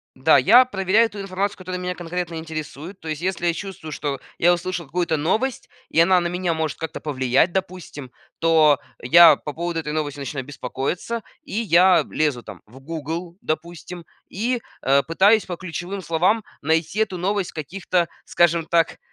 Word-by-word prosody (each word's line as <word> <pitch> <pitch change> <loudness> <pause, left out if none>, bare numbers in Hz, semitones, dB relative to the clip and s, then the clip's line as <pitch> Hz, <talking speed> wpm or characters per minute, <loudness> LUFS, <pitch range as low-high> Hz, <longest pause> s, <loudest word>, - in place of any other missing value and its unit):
да, 130 +5 +5
я 245 +6 +7
проверяю 210 0 +2
ту 205 -1 -9
информацию, 195 +1 -2
которая 185 -1 -6
меня 180 0 -3
конкретно 175 0 -4
интересует, 160 +2 -7
то 160 - -11
есть 155 0 -4
если 185 -1 -1
я 170 - +2
чувствую, 185 -4 -7
что 145 -2 -3 0.2
я 175 +1 +4
услышал 175 0 -3
какую-то 165 +2 -1
новость 220 - -1 0.2
и - - +1
она 180 +2 +5
на 175 - -1
меня 180 0 -1
может 160 -3 -2
как-то 160 - -5
повлиять, 130 +2 +1
допустим, 180 -8 -5 0.3
то 160 -3 +4 0.2
я 160 +3 +8
по 150 - -7
поводу 170 +1 -3
этой 150 -2 -4
новости 150 -2 -3
начинаю 135 -1 -5
беспокоиться, 145 - -4 0.2
и - - -11
я 185 -4 +4
лезу, 145 -6 0
там, - - -11
в 125 +5 -15
"Гугл", 165 +4 -6
допустим, 170 +2 -5 0.2
и, 235 +5 -2 0.2
э, 135 +2 +4
пытаюсь 200 +6 +3
по 175 -2 -5
ключевым 185 +2 -5
словам 180 +7 +1 0.2
найти 160 +6 0
эту 215 -4 0
новость 195 +1 -1
в - - -29
каких-то, 175 +2 -1 0.2
скажем 170 -1 +2
так, 165 -1 +1
170 Hz, 175 wpm, -22 LUFS, 155-185 Hz, 0.3 s, я